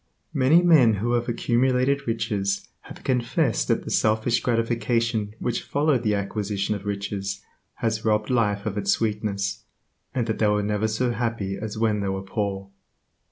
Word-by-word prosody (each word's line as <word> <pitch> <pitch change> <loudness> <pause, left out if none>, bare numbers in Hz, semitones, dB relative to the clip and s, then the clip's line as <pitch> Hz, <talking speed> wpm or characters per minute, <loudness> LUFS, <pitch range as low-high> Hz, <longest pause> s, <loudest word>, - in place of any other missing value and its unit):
Many 140 +6 +5
men 140 -11 +6
who 115 +4 -1
have 120 0 0
accumulated 130 +3 +1
riches 105 -4 -1
have - - -12
confessed 125 - +1
that - - +1
the - - -6
selfish 110 +2 +2
gratification 115 -2 0
which 120 +1 -2
followed 145 -3 +1
the 105 -3 +1
acquisition 100 0 -2
of 100 0 -6
riches 100 -1 -3 0.3
has 110 -1 -1
robbed 105 +1 +1
life 105 -4 +1
of 105 -1 -2
its 100 -1 -3
sweetness, 105 -1 -1 0.5
and 125 -3 +1
that 110 -1 -2
they 110 - +3
were 105 0 +2
never 105 +1 0
so 120 +3 0
happy 115 -4 -2
as 110 +1 -5
when 110 -2 +1
they 100 -1 -1
were 95 0 -3
poor. 100 -1 -3
110 Hz, 160 wpm, -24 LUFS, 100-120 Hz, 0.5 s, men